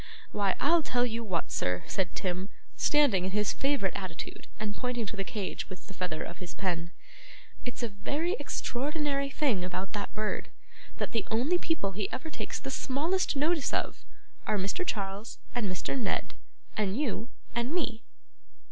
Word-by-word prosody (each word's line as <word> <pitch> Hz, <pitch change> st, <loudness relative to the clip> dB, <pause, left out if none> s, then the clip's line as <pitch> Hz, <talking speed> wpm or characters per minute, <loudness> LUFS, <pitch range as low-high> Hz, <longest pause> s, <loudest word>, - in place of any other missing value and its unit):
'Why, 200 Hz, -2 st, +2 dB
I'll 330 Hz, +3 st, +6 dB
tell 245 Hz, -4 st, +3 dB
you 230 Hz, -1 st, -1 dB
what, 185 Hz, -7 st, 0 dB
sir,' 90 Hz, 0 st, +1 dB
said 185 Hz, -2 st, 0 dB
Tim, 185 Hz, +1 st, -1 dB, 0.3 s
standing 285 Hz, -, +5 dB
in 185 Hz, -, +1 dB
his 210 Hz, +2 st, +2 dB
favourite 270 Hz, -9 st, +2 dB
attitude 185 Hz, -4 st, -5 dB
and 210 Hz, -1 st, -1 dB
pointing 250 Hz, -2 st, 0 dB
to 210 Hz, -, -4 dB
the 195 Hz, -, 0 dB
cage 200 Hz, 0 st, -3 dB
with 185 Hz, -, -8 dB
the 195 Hz, -, -9 dB
feather 180 Hz, -4 st, -1 dB
of 170 Hz, -, -7 dB
his 180 Hz, -2 st, -6 dB
pen, 170 Hz, -3 st, 0 dB, 0.8 s
'it's 245 Hz, 0 st, -3 dB
a -, -, +3 dB
very 285 Hz, -, 0 dB
extraordinary 280 Hz, +1 st, 0 dB
thing 265 Hz, -10 st, +2 dB
about 185 Hz, +1 st, -2 dB
that 205 Hz, -1 st, -2 dB
bird, 215 Hz, 0 st, -1 dB, 0.5 s
that -, -, -1 dB
the 225 Hz, -, 0 dB
only 265 Hz, +11 st, +3 dB
people 320 Hz, -, +1 dB
he 195 Hz, +1 st, -1 dB
ever 320 Hz, +4 st, -3 dB
takes -, -, -3 dB
the 270 Hz, -, -4 dB
smallest 315 Hz, +9 st, +2 dB
notice 300 Hz, +1 st, +3 dB
of, -, -, -1 dB, 0.4 s
are 210 Hz, -, +3 dB
Mr. 200 Hz, -, +1 dB
Charles, 200 Hz, -, -2 dB, 0.2 s
and 235 Hz, -5 st, +1 dB
Mr. 180 Hz, -, -1 dB
Ned, 235 Hz, -7 st, 0 dB, 0.4 s
and 205 Hz, 0 st, +1 dB
you, 245 Hz, -4 st, 0 dB, 0.2 s
and 235 Hz, +2 st, +1 dB
me. 250 Hz, -10 st, 0 dB
220 Hz, 170 wpm, -31 LUFS, 195-275 Hz, 0.8 s, I'll